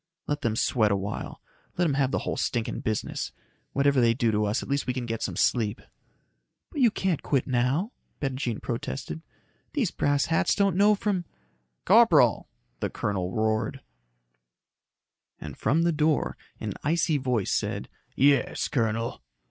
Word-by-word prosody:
"Let 145 0 -2
them 115 -5 0
sweat 110 -1 +2
a 100 - +2
while. 100 +1 -5 0.3
Let 175 -1 +3
'em 145 - +1
have 135 -1 +2
the - - 0
whole - - -1
stinking 120 -2 -1
business. 110 -1 -3 0.4
Whatever 140 -1 +3
they 115 -1 +4
do 115 -3 +2
to 105 0 +1
us, 105 +3 0
at - - -9
least 140 0 -1
we 125 - -1
can 125 -2 -3
get 115 -1 -3
some - - -2
sleep." 110 -2 +1 0.9
"But 295 - -3
you 240 - +7
can't 190 -6 -1
quit 135 -3 0
now," 130 - 0 0.3
Bettijean 130 -4 -2
protested. 130 +6 -4 0.5
"These 260 - 0
brass 145 -1 +1
hats 165 0 +2
don't 200 -3 +2
know 205 +2 +5
from 200 -3 -1 0.3
" - - -46
"Corporal!" - - +5 0.3
the - - -1
colonel 95 -3 -2
roared. 110 +5 0 1.6
And 75 -3 -7
from 160 +4 +1
the 170 - +3
door, 155 -1 +1 0.2
an - - -3
icy 160 0 +2
voice 125 -6 0
said, - - -1 0.3
"Yes, 140 +1 +2
colonel?" 115 - -1
130 Hz, 160 wpm, -27 LUFS, 110-155 Hz, 1.6 s, you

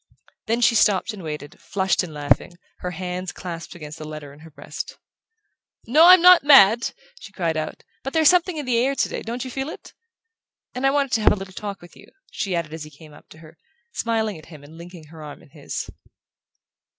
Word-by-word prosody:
Then 230 +2 0
she 235 - +4
stopped 205 -1 +2
and 205 - -9
waited, 150 -1 -8
flushed 190 -1 0
and 180 -4 -6
laughing, 145 +2 0 0.3
her 180 - -4
hands 180 +1 -5
clasped 170 -2 -8
against 150 -1 -10
the 155 - -7
letter 155 -2 -9
in 145 - -17
her 160 +1 -14
breast. 145 0 -8 0.9
"No, 305 +9 +6
I'm 365 -1 +8
not 360 -3 +8
mad," 235 -6 +6 0.2
she 215 - -12
called 170 -4 -2
out; 155 0 -5 0.2
"but 270 - -5
there's 320 0 +3
something 360 0 +3
in 295 - -4
the 240 -2 +1
air 270 +3 +1
today - - -2
don't 240 +3 -5
you 255 - -7
feel 270 +3 -4
it? - - -11 0.8
And 260 +2 0
I - - +5
wanted 275 -1 0
to 225 - +1
have - - +5
a - - +2
little 195 -1 -9
talk 200 -2 -7
with 175 - -15
you," - - -16 0.2
she 195 -4 -3
added 165 -2 -3
as 160 -1 -6
he 150 - -10
came 155 +1 -16
up - - -18
to - - -15
her, 160 +2 -18 0.3
smiling 220 - -2
at 155 - -16
him 155 -4 -13
and 150 +3 -14
linking 170 0 -12
her 160 -1 -12
arm 150 -1 -10
in - - -20
his. 145 -1 -6
185 Hz, 220 wpm, -22 LUFS, 155-240 Hz, 0.9 s, I'm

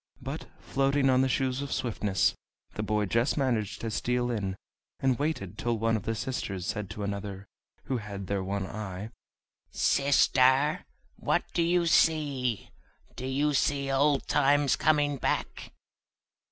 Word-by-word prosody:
But, - - -6
floating 135 0 +1
on 130 0 +4
the 130 - +2
Shoes 130 +1 0
of 140 - -5
Swiftness, 105 -5 0 0.4
the - - -4
boy 105 0 0
just 115 +9 +1
managed 110 -6 -1
to 115 - -3
steal 125 +2 0
in, 100 -5 -2 0.4
and 130 -2 +1
waited 145 - -3
till 120 -1 0
one 115 +1 +1
of 105 - -4
the 115 - -1
sisters 100 -6 -3
said 105 -2 -3
to 105 0 -6
another, 100 -1 -5 0.4
who 130 - -2
had 100 -3 -6
their 100 0 -2
one 100 0 -2
eye: 105 +1 -6 0.6
"Sister, 140 +1 +3 0.3
what - - +1
do - - +1
you 170 +1 +2
see? 145 -8 +1 0.4
do 130 - -5
you 145 +3 +1
see 140 0 +1
old 140 +1 +2
times 145 -1 +3
coming 145 -2 +2
back?" - - -2
125 Hz, 150 wpm, -28 LUFS, 105-140 Hz, 0.6 s, on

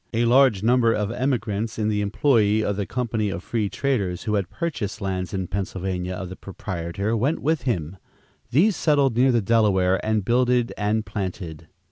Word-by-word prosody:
A 120 +1 +2
large 120 -4 +4
number 115 0 +4
of 105 -1 -1
emigrants 115 -4 -2
in 105 -1 0
the 105 -1 0
employ 110 0 +2
of 100 - 0
the 100 -1 -3
"company 115 -3 -1
of 95 -2 -5
free 110 -4 -1
traders" 100 -11 -1
who 105 - -2
had 100 -4 0
purchased 140 - -4
lands 95 -3 -3
in 95 -1 -2
Pennsylvania 95 -1 -3
of 90 -1 -6
the 95 - -7
proprietor, 95 +3 -4
went 135 +9 +1
with 145 -3 -1
him. 85 -4 -2 0.5
These 185 - +3
settled 140 -6 +2
near 130 +2 +4
the 120 -3 +1
Delaware 95 -4 +2
and 110 -2 0
"builded 125 0 +2
and 105 +1 0
planted." 90 -6 -5
105 Hz, 175 wpm, -23 LUFS, 95-120 Hz, 0.5 s, large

